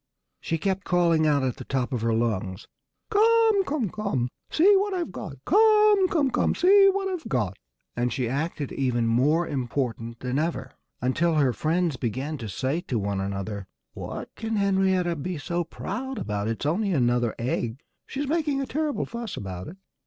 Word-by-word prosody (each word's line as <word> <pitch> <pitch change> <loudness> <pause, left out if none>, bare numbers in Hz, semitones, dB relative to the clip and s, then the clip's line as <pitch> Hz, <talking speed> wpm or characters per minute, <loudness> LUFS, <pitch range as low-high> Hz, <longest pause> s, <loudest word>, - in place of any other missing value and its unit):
She 165 - -2
kept 190 +3 -1
calling 170 -3 +3
out 145 -2 +2
at 130 -1 -1
the 130 - -7
top 130 0 -2
of 120 - -1
her 115 0 +1
lungs, 110 -4 -1 0.4
"Come 445 -1 +4
come 275 -6 -1
come! 165 - -1 0.2
See 390 +6 +5
what 400 0 0
I've 345 - -2
got! 155 -5 -7
Come 425 0 +5
come 290 -7 +1
come! - - +1
See 390 +3 +6
what 390 0 -1
I've 365 -4 -4
got!" 105 -8 0 0.4
And 120 +1 0
she 130 -3 -1
acted 145 +2 -2
even 125 -3 0
more 145 +9 +2
important 120 -3 -3
than 130 +2 -1
ever, 165 +2 -2 0.3
until 160 +7 +1
her 140 -5 +3
friends 165 +1 0
began 130 +6 -3
to 110 -3 -5
say 135 - -1
to 125 - -3
one 100 -2 -1
another, 100 0 -4 0.3
"What - - -7
can 225 0 -3
Henrietta 190 -3 +2
be 170 +4 -4
so 175 +3 -2
proud 240 +10 -5
about? 105 - -2
If 115 - +1
it's 115 - -7
only 195 +7 +1
another 120 -4 +1
egg, 120 0 -2 0.3
she's 280 +1 -3
making 300 -2 0
a 275 - -1
terrible 300 +1 -1
fuss 235 -2 -6
about 95 -2 -6
it." 185 - -10
155 Hz, 180 wpm, -26 LUFS, -, 0.4 s, See